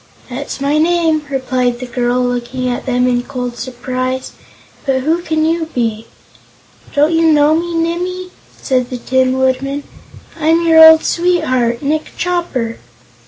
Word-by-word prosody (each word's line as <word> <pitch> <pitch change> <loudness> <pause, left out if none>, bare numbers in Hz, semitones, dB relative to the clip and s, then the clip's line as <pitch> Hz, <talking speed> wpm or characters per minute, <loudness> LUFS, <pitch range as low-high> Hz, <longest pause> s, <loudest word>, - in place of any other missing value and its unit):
"That's 275 +3 -5
my 285 +2 +1
name," 325 -2 +1
replied 255 -2 -1
the 255 - -6
girl, 245 0 0
looking 245 +1 -2
at 245 +2 -3
them 250 0 +1
in 245 -1 +1
cold 250 -2 -5
surprise. 255 +1 -4 0.5
"But 265 -2 0
who 320 +5 0
can 315 -2 0
you 325 0 0
be?" 225 -3 -2 0.9
"Don't 295 +3 +3
you 325 0 +4
know 300 0 +4
me, 340 +1 -1
Nimmie?" 360 +2 -2 0.3
said 255 -2 0
the 250 - -4
Tin 260 +1 +1
Woodman. 270 +2 0 0.6
"I'm 325 +2 +2
your 320 -1 +7
old 320 0 +8
sweetheart, 275 -9 0
Nick 305 +2 -2
Chopper!" 340 -11 -2
275 Hz, 145 wpm, -15 LUFS, 250-320 Hz, 0.9 s, old